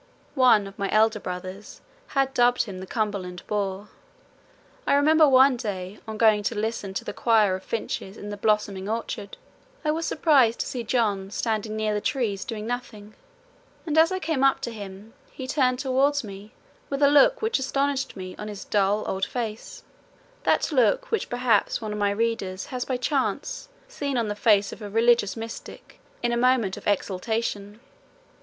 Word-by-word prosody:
One 250 -7 +5
of 195 0 -11
my 200 - -1
elder 220 0 +3
brothers 185 +2 -7 0.3
had 270 -1 0
dubbed 245 -1 +3
him 195 -5 -8
the 190 - -8
"Cumberland 200 -5 -3
boor." 200 -1 -3 1.0
I - - +4
remember 305 +1 +5
one 260 0 +6
day 195 -3 -5
on 220 -1 -5
going 215 -2 +4
to 225 +2 -2
listen 210 -2 -3
to - - -3
the - - -4
choir 220 -5 +3
of 185 - -3
finches 200 -2 -4
in 205 - -7
the - - -4
blossoming 205 -2 0
orchard, 220 -3 -4 0.5
I 305 - +3
was 325 +2 -2
surprised 270 -8 +3
to - - -2
see 250 -4 -4
John 210 -5 0
standing 215 0 -2
near 215 -1 0
the 210 - -1
trees 215 -8 -1
doing 220 -5 -5
nothing, 220 -3 -6 0.7
and 310 -3 -2
as 320 +2 +5
I 375 - 0
came 315 -6 -1
up 270 -1 +4
to 235 - -3
him 205 0 -9 0.2
he 260 - -8
turned 255 -2 +1
towards 275 +2 +1
me 200 0 -10 0.4
with 280 +1 -1
a - - +8
look 295 - +5
which 445 -8 +1
astonished 275 0 -1
me 185 -2 -7
on 210 - -6
his 205 -1 -7
dull 205 +1 +1
old 190 0 -1
face 235 - -5 0.6
that - - +2
look 260 - +2
which 450 - -1
perhaps 245 -4 +1
one 215 -2 -4
of 210 - -4
my 205 0 +2
readers 200 -3 -2
has 255 -1 -4
by 255 - -1
chance 300 - -2 0.2
seen 285 - -3
on 230 -3 0
the 205 - -2
face 205 -1 +3
of - - -12
a 205 - -6
religious 230 -1 +3
mystic 225 0 -9 0.2
in 240 - +1
a 235 - 0
moment 240 -6 +2
of - - -9
exaltation. 205 +1 -2
225 Hz, 180 wpm, -25 LUFS, 205-260 Hz, 1.0 s, a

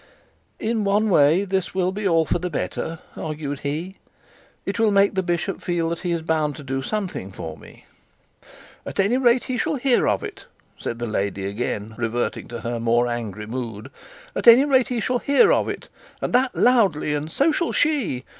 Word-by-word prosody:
'In 220 -1 -1
one 205 +2 +2
way 165 +4 +4
this 190 -1 -2
will 185 -1 +1
be 205 +2 -5
for 165 -2 +2
the 180 +1 -3
better,' 165 +1 -3 0.2
argued 150 -2 -4
he. 160 +7 -4 0.7
'It 200 +4 -3
will 225 -1 +4
make 200 0 +4
the 190 - +1
bishop 175 +1 -2
feel 170 -2 -1
that 170 - -3
he 180 - -3
is 170 -1 -1
bound 155 -2 0
to 150 - -9
do 135 0 -2
something 185 - -4
for 80 -4 -7
me.' 75 - -16 1.0
'At - - -7
any 200 +6 +3
rate, 245 -1 +3
he 250 -2 -3
shall 315 -1 0
hear 260 -2 +2
of 100 -2 +1
it,' - - -8 0.3
said 115 - -5
the 120 - -3
lady, 100 -3 -2
again 105 +1 -3
reverting 120 +1 -2
to 120 -1 -7
her 120 0 -3
more 120 +1 +2
angry 110 -4 -4
mood. 115 -2 -6 0.4
'At - - -2
any 240 +4 +9
rate 260 -3 +3
he 245 -3 -2
shall 250 +4 0
hear 280 +2 +4
of - - +1
it, - - -6 0.3
and - - -3
that 255 +1 +2
loudly; 200 -12 +3
and 150 +2 -3
so 285 - +3
shall 335 +2 0
she. 265 - 0
170 Hz, 190 wpm, -23 LUFS, -, 1.0 s, any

